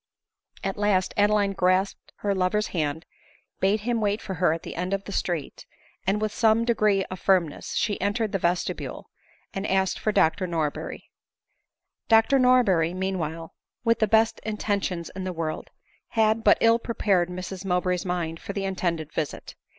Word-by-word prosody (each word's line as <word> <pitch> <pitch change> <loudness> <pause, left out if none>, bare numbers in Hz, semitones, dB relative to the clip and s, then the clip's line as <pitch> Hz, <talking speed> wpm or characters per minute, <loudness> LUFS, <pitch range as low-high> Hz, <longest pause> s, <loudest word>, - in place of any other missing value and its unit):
At 195 0 -2
last 205 -3 +1
Adeline 205 -1 +3
grasped 185 +1 0
her 200 -1 +1
lover's 195 +3 0
hand, 160 -1 -2 0.5
bade 200 +2 +2
him 235 +1 -1
wait 205 0 +1
for 195 - -6
her 180 -2 +2
at 165 +1 -3
the - - -7
end 180 +3 -1
of 195 - -6
the 200 - -8
street, 175 -5 -3 0.4
and 200 +2 +2
with 215 -1 -2
some 225 0 +3
degree 215 -4 +2
of 185 - -5
firmness 180 -6 +1
she 210 -1 0
entered 205 +2 0
the 195 - -1
vestibule, 175 +1 -2 0.4
and 195 +1 -3
asked 190 -1 +1
for 215 - 0
Dr 185 0 +2
Norberry. 160 -4 -3 1.0
Dr 225 +4 +5
Norberry, 200 -10 +4
meanwhile, 165 -4 -3 0.3
with 230 -1 +2
the 215 - +3
best 220 +1 +3
intentions 200 -5 -2
in 190 - -4
the 185 - -2
world, 160 -2 -4 0.4
had 220 0 +2
but - - +6
ill 230 0 +5
prepared 195 -7 +1
Mrs 185 +1 -6
Mowbray's 180 -1 0
mind 170 -3 -3
for 200 - -6
the 195 -1 -2
intended 170 -5 -2
visit. 150 -3 -4
195 Hz, 165 wpm, -25 LUFS, 180-210 Hz, 1.0 s, but